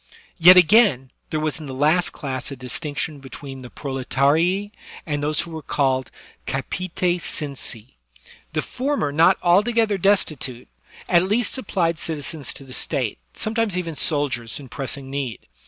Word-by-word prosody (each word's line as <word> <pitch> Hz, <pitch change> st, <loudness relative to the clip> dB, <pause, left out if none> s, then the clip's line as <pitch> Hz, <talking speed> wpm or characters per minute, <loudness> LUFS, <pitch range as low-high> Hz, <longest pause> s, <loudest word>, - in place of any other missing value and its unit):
Yet 180 Hz, +2 st, +9 dB
again, 175 Hz, -, +5 dB, 0.2 s
there 155 Hz, -, -1 dB
was 155 Hz, +1 st, -2 dB
in 155 Hz, -, -8 dB
the 130 Hz, -, -6 dB
last 155 Hz, +6 st, +3 dB
class 130 Hz, -3 st, -5 dB
a 140 Hz, -, -6 dB
distinction 145 Hz, +3 st, -4 dB
between 135 Hz, 0 st, -9 dB
the 125 Hz, -, -9 dB
proletarii 145 Hz, +10 st, +1 dB, 0.3 s
and 145 Hz, -2 st, -2 dB
those 150 Hz, +1 st, +1 dB
who 170 Hz, -, -8 dB
were 160 Hz, -1 st, -6 dB
called 130 Hz, -3 st, 0 dB, 0.4 s
capite 185 Hz, -2 st, -3 dB, 0.2 s
censi. 135 Hz, -7 st, -3 dB, 0.6 s
The -, -, 0 dB
former 265 Hz, -, -1 dB
not 165 Hz, +6 st, +5 dB
altogether 210 Hz, +3 st, +3 dB
destitute, 155 Hz, -10 st, 0 dB, 0.4 s
at 175 Hz, +1 st, +4 dB
least 220 Hz, +1 st, +1 dB
sup 260 Hz, -6 st, -5 dB
plied 170 Hz, -3 st, +1 dB
citizens 155 Hz, -4 st, -4 dB
to -, -, -10 dB
the 130 Hz, -1 st, -11 dB
State, 130 Hz, -5 st, -2 dB, 0.2 s
sometimes 220 Hz, -3 st, -1 dB
even 170 Hz, -3 st, -3 dB
soldiers 135 Hz, -6 st, 0 dB
in 135 Hz, -3 st, -11 dB
pressing 135 Hz, 0 st, -5 dB
need. 135 Hz, -4 st, -4 dB
150 Hz, 150 wpm, -22 LUFS, 135-180 Hz, 0.6 s, Yet